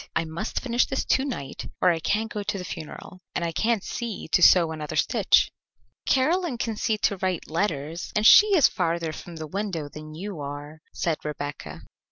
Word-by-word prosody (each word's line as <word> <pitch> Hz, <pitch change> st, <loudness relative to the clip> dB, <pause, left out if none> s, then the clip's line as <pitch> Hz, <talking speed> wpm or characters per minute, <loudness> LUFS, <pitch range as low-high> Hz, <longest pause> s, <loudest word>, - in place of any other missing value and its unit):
I 165 Hz, -, +1 dB
must 165 Hz, +7 st, -4 dB
finish 240 Hz, -1 st, +1 dB
this 265 Hz, -, -2 dB
to 265 Hz, -, +2 dB
night 185 Hz, -, -5 dB
or 180 Hz, -, +5 dB
I 165 Hz, -, -1 dB
can't 215 Hz, +6 st, -1 dB
go 210 Hz, -, -3 dB
to 205 Hz, 0 st, -2 dB
the 180 Hz, -, -6 dB
funeral, 180 Hz, +3 st, -8 dB
and 170 Hz, -, 0 dB
I 165 Hz, -, -1 dB
can't 220 Hz, +3 st, 0 dB
see 235 Hz, -4 st, -5 dB
to 170 Hz, -, +3 dB
sew 170 Hz, -2 st, +6 dB
another 155 Hz, -2 st, -5 dB
stitch." -, -, +3 dB, 0.6 s
"Caroline 315 Hz, +1 st, +2 dB
can 230 Hz, -2 st, -2 dB
see 215 Hz, 0 st, 0 dB
to 200 Hz, -1 st, 0 dB
write 185 Hz, -2 st, -2 dB
letters, 165 Hz, -2 st, -2 dB
and 210 Hz, 0 st, +1 dB
she 420 Hz, -, +9 dB
is 300 Hz, -, +7 dB
farther 165 Hz, -2 st, -1 dB
from 170 Hz, +2 st, -9 dB
the 160 Hz, -1 st, -6 dB
window 180 Hz, -3 st, -4 dB
than 155 Hz, +1 st, -10 dB
you 190 Hz, 0 st, -6 dB
are," 145 Hz, +2 st, -7 dB
said 165 Hz, -3 st, -1 dB
Rebecca. 145 Hz, -2 st, -6 dB
180 Hz, 195 wpm, -25 LUFS, 155-215 Hz, 0.6 s, she